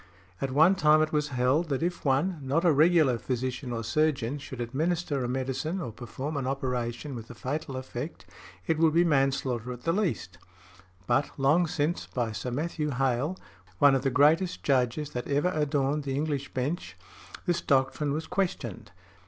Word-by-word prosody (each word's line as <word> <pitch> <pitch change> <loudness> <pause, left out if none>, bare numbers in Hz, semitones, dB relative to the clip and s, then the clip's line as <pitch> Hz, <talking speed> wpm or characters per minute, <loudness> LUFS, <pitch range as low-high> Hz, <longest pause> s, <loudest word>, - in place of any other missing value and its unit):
At 135 - -1
one 155 +8 +5
time 155 -3 +4
it 155 - -3
was 150 -1 +1
held, 135 +5 +1
that 140 +1 -1
if 175 +1 -2
one, 150 +6 +1
not 140 +6 0
a 170 - +6
regular 155 -4 +4
physician 130 +1 -3
or 115 -1 -3
surgeon, 140 +1 0
should 130 -2 -8
administer 145 +3 -1
a - - -1
medicine 135 +7 -2
or 145 -10 -4
perform 130 +6 -5
an 135 -2 -2
operation 125 0 -2
with 115 -2 -8
a 120 - -9
fatal 135 +3 -4
effect, 130 +3 -6 0.4
it 160 -1 0
would 160 -1 +4
be 170 - +6
manslaughter 135 -5 +1
at 125 0 -8
the 165 - +1
least; 170 - -2 0.7
but 125 +4 +2
long 150 +6 +3
since, 160 0 -1
by 120 -3 -2
Sir 105 +4 -4
Matthew 150 +3 -2
Hale, 135 +5 0 0.4
(one 140 +7 +6
of 135 - +2
the 135 - +1
greatest 160 +7 +3
Judges 135 +2 +1
that 125 -3 -4
ever 145 +6 +1
adorned 145 -1 0
the 135 -1 -2
English 145 -1 -2
Bench), 125 - -3 0.5
this 175 -1 +1
doctrine 140 +2 +1
was 155 +3 -2
questioned. 175 - -3
140 Hz, 175 wpm, -28 LUFS, 125-155 Hz, 0.7 s, a